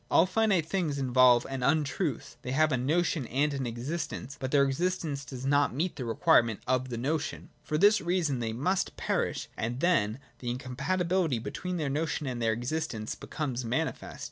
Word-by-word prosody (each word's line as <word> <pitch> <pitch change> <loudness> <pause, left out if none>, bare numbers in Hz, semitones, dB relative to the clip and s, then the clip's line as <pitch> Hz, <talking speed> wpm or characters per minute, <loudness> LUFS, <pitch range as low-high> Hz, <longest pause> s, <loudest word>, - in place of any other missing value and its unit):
All 165 - +5
finite 190 -4 +2
things^involve 130 -8 +3
an 135 -1 -4
untruth: 150 - 0
they 125 - -4
have 155 +2 +3
a - - +3
notion 150 +1 0
and 145 +4 +1
an 135 -3 -2
existence, 135 +2 -4
but 130 - -3
their 140 0 +4
existence 150 0 -1
does 130 0 -7
not 145 -2 +2
meet 170 +5 -1
the 130 - -5
requirements 115 - +3
of 130 0 0
the 120 - -4
notion. 145 +6 -2
For 150 - -2
this 205 +5 +5
reason 170 -6 0
they 115 -2 -2
must 150 +12 -1
perish, - - -1
and 120 +3 -3
then 115 -11 +2 0.2
the 120 - -4
incompatibility 160 +5 0
between 180 +10 -4
their 155 -3 -1
notion 150 +1 -1
and 125 -3 -3
their 115 -1 +2
existence 120 -2 -3
becomes 130 -5 -4
manifest. 130 +8 -3
140 Hz, 170 wpm, -29 LUFS, 125-165 Hz, 0.2 s, All